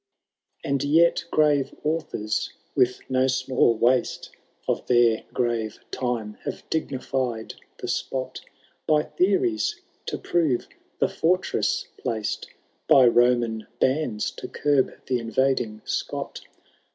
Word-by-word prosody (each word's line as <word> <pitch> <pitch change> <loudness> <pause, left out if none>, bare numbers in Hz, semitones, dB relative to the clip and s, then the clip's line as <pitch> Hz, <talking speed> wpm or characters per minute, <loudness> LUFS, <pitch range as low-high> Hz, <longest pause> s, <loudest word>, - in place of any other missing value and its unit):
And 140 -1 0
yet 165 +4 +4
gmre 145 -3 +2
authors, 150 -9 -1 0.2
with 125 0 +2
no 130 0 +2
small 130 -2 +2
waste 125 +2 +1 0.4
Of - - -1
their 120 -2 +4
gmre 115 -3 -1
time, 120 -4 -3
have - - -6
dignified 130 -6 -2 0.2
the - - -6
spot 130 -1 -3 0.5
By 150 -1 +4
theories, 350 - +1 0.3
to - - -2
prore 155 -8 +1 0.3
the - - +2
fortress 180 +3 0
placed 110 -4 -2 0.4
By 130 - +7
Roman 120 -2 +3
huida, 130 -6 0
to - - -6
curb 145 -3 +1
the 125 -2 0
iuTsding 115 -2 0
Scot. - - -3
130 Hz, 110 wpm, -25 LUFS, 120-150 Hz, 0.5 s, By